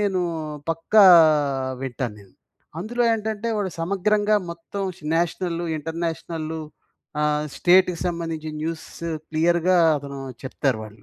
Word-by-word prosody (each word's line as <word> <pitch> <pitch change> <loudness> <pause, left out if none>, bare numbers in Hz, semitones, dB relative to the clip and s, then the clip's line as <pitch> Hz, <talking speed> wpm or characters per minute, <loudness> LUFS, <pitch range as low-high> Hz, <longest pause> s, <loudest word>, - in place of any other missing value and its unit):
నేను 195 -3 +1 0.5
పక్కా 180 +6 +4 0.8
వింటాను 125 -3 -4
నేను. 95 -2 -19 0.5
అందులో 240 +6 -1
ఏంటంటే, 220 0 -2
వాడు 195 -2 -1
సమగ్రంగా 205 +4 +2
మొత్తం 170 +4 -6 0.3
నేషనల్లు, 170 0 -1
ఇంటర్నేషనల్లు, 160 0 -4 0.6
ఆహ్, 150 0 +1
స్టేట్‌కి 180 -1 +4
సంబంధించిన 165 -3 -4
న్యూసు 165 +1 -5 0.2
క్లియర్‌గా 170 +3 +3 0.2
అతను 140 -1 -8 0.2
చెప్తారు 130 -2 -1
వాళ్ళు. 105 0 -14
170 Hz, 105 wpm, -23 LUFS, 155-190 Hz, 0.8 s, పక్కా